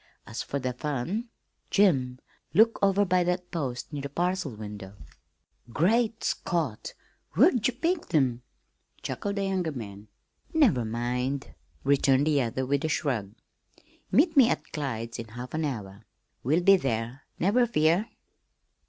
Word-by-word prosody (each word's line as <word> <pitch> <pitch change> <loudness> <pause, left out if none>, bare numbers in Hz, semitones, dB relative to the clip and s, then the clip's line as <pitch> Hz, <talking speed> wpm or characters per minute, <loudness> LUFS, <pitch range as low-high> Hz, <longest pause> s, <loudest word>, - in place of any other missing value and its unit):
As - - -5
for 140 - -3
the 130 -2 -2
fun, 150 - -3 0.4
Jim, 135 -11 +3 0.4
look 225 +4 +5
over 200 0 +3
by 180 -1 +3
that 180 0 -2
post 135 -5 -4
near 145 - -3
the 140 - -5
parcel 175 -3 -1
window." 105 -2 -8 0.8
"Great 225 - +2
Scott! 160 - -2 0.4
Where'd 255 - +4
you 255 - -1
pick 335 - -1
'em?" 125 -5 +2 0.6
chuckled 200 0 -3
the 200 - -1
younger 185 -4 -1
man. 105 -6 -8 0.5
"Never 215 - +4
mind," 125 +4 -2 0.3
returned 135 0 +3
the 150 -3 +3
other 125 +2 -2
with 140 +1 0
a 160 - 0
shrug. 115 -10 -1 0.8
"Meet 325 0 +4
me 260 -4 +7
at - - -2
Clyde's 115 -6 -4
in 115 - -6
half 120 +3 -8
an 160 0 0
hour. 105 -6 -5 0.4
We'll 155 +8 +1
be 195 +1 +7
there, 120 -2 -3
never 240 +7 +3
fear." 170 +2 +2
145 Hz, 145 wpm, -27 LUFS, 125-195 Hz, 0.8 s, me